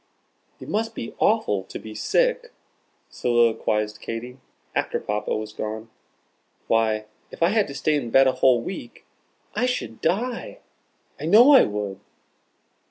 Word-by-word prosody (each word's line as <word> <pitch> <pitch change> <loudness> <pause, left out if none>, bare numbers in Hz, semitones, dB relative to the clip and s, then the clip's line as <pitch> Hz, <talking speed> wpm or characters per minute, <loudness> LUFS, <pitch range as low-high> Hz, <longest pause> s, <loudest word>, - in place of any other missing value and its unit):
"It - - -10
must 225 +1 -2
be 115 - -6
awful 205 - +2
to - - -8
be 110 - -9
sick," - - 0 0.6
soliloquized 110 -3 +1
Katy, 125 +3 -6 0.3
after - - -1
Papa 105 +1 -2
was 110 0 -6
gone. 110 +1 -6 0.7
"Why, 110 -1 +1 0.2
if - - -4
I 170 - +5
had 215 0 +2
to 140 - -8
stay 155 - +1
in 140 -6 -1
bed 135 +3 +6
a 130 - +4
whole 130 -2 +3
week 190 - -8 0.5
I 250 - +1
should 250 - -4
die, 230 +9 -1 0.6
I - - -5
know 240 +7 +7
I 275 - +9
should." 105 -2 -2
125 Hz, 145 wpm, -24 LUFS, -, 0.7 s, I